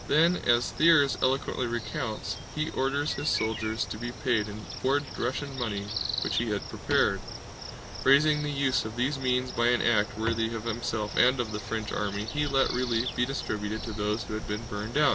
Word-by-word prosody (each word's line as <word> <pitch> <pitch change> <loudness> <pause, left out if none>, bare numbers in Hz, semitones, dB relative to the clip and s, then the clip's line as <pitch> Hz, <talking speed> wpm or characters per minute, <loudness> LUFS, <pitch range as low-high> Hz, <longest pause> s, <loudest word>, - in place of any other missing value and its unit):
Then, 165 +4 +4
as 120 0 +3
Thiers 145 -5 +5
eloquently 130 -1 +1
recounts, 115 0 -3 0.2
he 155 +1 -1
ordered 140 +3 0
his 145 +2 -1
soldiers 110 0 0
to 105 - -7
be 120 +1 -4
paid 120 -5 0
in 105 0 -8 0.2
forged 140 +1 0
Russian 135 +2 -3
money 105 -5 -2 0.4
which - - -1
he - - +1
had - - -2
prepared: - - +1 0.8
"Raising 150 +3 +5
the 150 - -2
use 140 -2 +1
of 110 0 -6
these 135 +4 0
means 125 -1 0
by 120 0 +1
an 120 0 +3
act 105 -3 +2
worthy 115 +1 0
of 110 - -5
himself 110 -2 -2
and 130 +2 +4
of 115 -3 -1
the 105 - -3
French 110 +1 -4
army, 100 0 -2
he 150 +5 -1
let 135 -1 +2
relief 125 -1 0
be 125 - +1
distributed 105 -5 -3
to 115 - -4
those 105 +1 -1
who 105 - -7
had 110 - -5
been 105 +2 -3
burned 105 +5 -4
out. 150 -1 +5
120 Hz, 195 wpm, -28 LUFS, 110-135 Hz, 0.8 s, Thiers